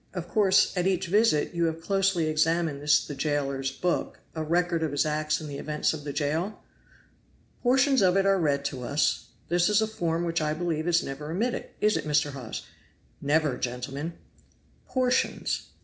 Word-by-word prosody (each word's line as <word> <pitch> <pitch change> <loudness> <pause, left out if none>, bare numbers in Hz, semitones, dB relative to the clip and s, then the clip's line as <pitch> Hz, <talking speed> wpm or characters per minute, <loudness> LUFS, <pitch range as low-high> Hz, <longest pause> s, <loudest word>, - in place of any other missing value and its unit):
Of 175 -1 -4
course, 195 0 +3
at 180 0 +1
each 185 -2 +1
visit, 190 -5 +2
you 170 -1 +1
have 160 0 -1
closely 195 -1 +1
examined 155 -1 +1
this 150 0 +3
the 145 - -6
jailer's 140 -2 -1
book, 175 +6 -2 0.2
a 160 - -3
record 170 +1 +1
of 160 -3 -1
his 145 - +2
acts 155 0 0
and 155 - -7
the 140 -1 -6
events 150 +1 0
of 150 -2 -7
the 145 - -3
jail?" 160 +8 -2 1.0
"Portions 265 +1 +3
of 185 0 +4
it 195 - +3
are 195 -1 +3
read 140 -4 +1
to 135 -3 -3
us; 140 +5 0 0.2
this 175 +2 +3
is 210 0 +4
a 220 - +2
form 170 -6 -2
which 165 -1 -1
I 155 0 0
believe 165 -1 -2
is 175 0 +3
never 150 +2 -6
omitted 225 +9 -2
is 210 0 +3
it, - - -4
Mr. 150 -1 +2
Hawes?" 125 -5 -6 0.6
"Never, 145 -2 +1
gentlemen!" 135 +6 -4 0.7
"'Portions!' 255 -1 0
160 Hz, 180 wpm, -27 LUFS, 145-180 Hz, 1.0 s, of